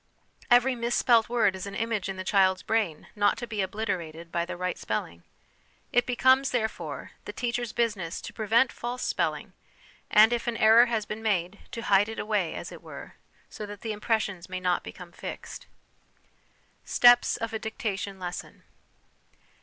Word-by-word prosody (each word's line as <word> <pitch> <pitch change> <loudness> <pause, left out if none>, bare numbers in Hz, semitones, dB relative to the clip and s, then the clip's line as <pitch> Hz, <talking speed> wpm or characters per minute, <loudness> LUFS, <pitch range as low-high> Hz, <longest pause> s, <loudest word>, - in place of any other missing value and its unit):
Every 245 +2 +5
misspelt 235 -1 +2
word 235 -5 +2
is 190 +1 -6
an 200 - -7
image 220 -4 -2
in 195 - -3
the 185 - -4
child's 190 -1 +3
brain 215 -9 -1
not 205 -1 +2
to 240 - -4
.be 215 -3 -3
obliterated 180 -5 -4
by 170 0 0
the 180 0 -6
right 180 0 -2
spelling. 85 -5 -4 0.7
It 245 0 +3
becomes, 260 +2 +4
therefore, 220 -3 -3
the - - -5
teacher's 240 -2 -2
business 205 -8 -1
to - - -8
prevent 230 +3 +2
false 245 +1 -5
spelling, - - -1 0.6
and, 220 +3 +6
if 235 0 -2
an 235 -1 -1
error 225 +3 +7
has 225 -3 -1
been 215 +1 -6
made, 200 -3 -1
to 230 - -5
hide 205 0 +4
it 225 - -6
away, 210 -6 -1
as - - -6
it - - -10
were, - - -10 0.3
so 210 - -8
that 205 -1 -9
the 220 -2 -3
impres 220 +1 +1
sion 195 -5 -5
may 185 0 -4
not 180 -1 +1
become 180 -2 -10
fixed. - - -8 1.2
Steps 245 0 +5
of 230 0 -4
a 220 - -2
Dictation 205 -3 -4
Lesson. 180 -1 -7
215 Hz, 170 wpm, -27 LUFS, 185-235 Hz, 1.2 s, error